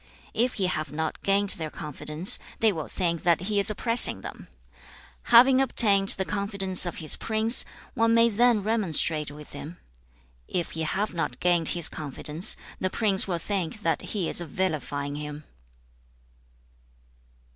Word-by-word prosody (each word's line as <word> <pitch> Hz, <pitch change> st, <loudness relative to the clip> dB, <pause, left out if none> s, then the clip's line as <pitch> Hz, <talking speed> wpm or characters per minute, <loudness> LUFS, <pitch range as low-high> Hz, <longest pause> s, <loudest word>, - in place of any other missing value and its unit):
If 240 Hz, +3 st, 0 dB
he 195 Hz, -, -1 dB
have 155 Hz, -5 st, -3 dB
not 160 Hz, +1 st, -4 dB
gained 200 Hz, 0 st, +1 dB
their 160 Hz, -4 st, -3 dB
confidence, 150 Hz, +4 st, -2 dB, 0.2 s
they 220 Hz, -1 st, +3 dB
will 160 Hz, -6 st, -6 dB
think 170 Hz, -3 st, -2 dB
that 170 Hz, -1 st, +2 dB
he 205 Hz, +2 st, -1 dB
is 200 Hz, -, +5 dB
oppressing 230 Hz, +3 st, +4 dB
them. -, -, -10 dB, 0.8 s
Having 255 Hz, +3 st, +6 dB
obtained 200 Hz, -6 st, +5 dB
the 190 Hz, -, -2 dB
confidence 200 Hz, -3 st, 0 dB
of 175 Hz, -, -5 dB
his 155 Hz, -, -1 dB
prince, 225 Hz, +1 st, +3 dB, 0.3 s
one 230 Hz, 0 st, +1 dB
may 230 Hz, 0 st, +5 dB
then 235 Hz, -1 st, +2 dB
remonstrate 170 Hz, -8 st, 0 dB
with 150 Hz, +1 st, -13 dB
him. 165 Hz, +4 st, -9 dB, 0.7 s
If 175 Hz, -2 st, -3 dB
he 160 Hz, -, -5 dB
have 190 Hz, +7 st, -2 dB
not 165 Hz, -8 st, -4 dB
gained 175 Hz, -2 st, +1 dB
his 170 Hz, -, +3 dB
confidence, 155 Hz, -, -2 dB, 0.2 s
the 185 Hz, -, -1 dB
prince 200 Hz, -2 st, +1 dB
will 175 Hz, -3 st, -2 dB
think 195 Hz, +2 st, -4 dB
that 165 Hz, -, 0 dB
he 195 Hz, -6 st, -4 dB
is -, -, +1 dB
vilifying 145 Hz, -4 st, -4 dB
him.' 150 Hz, 0 st, -8 dB
185 Hz, 150 wpm, -25 LUFS, 160-210 Hz, 0.8 s, Having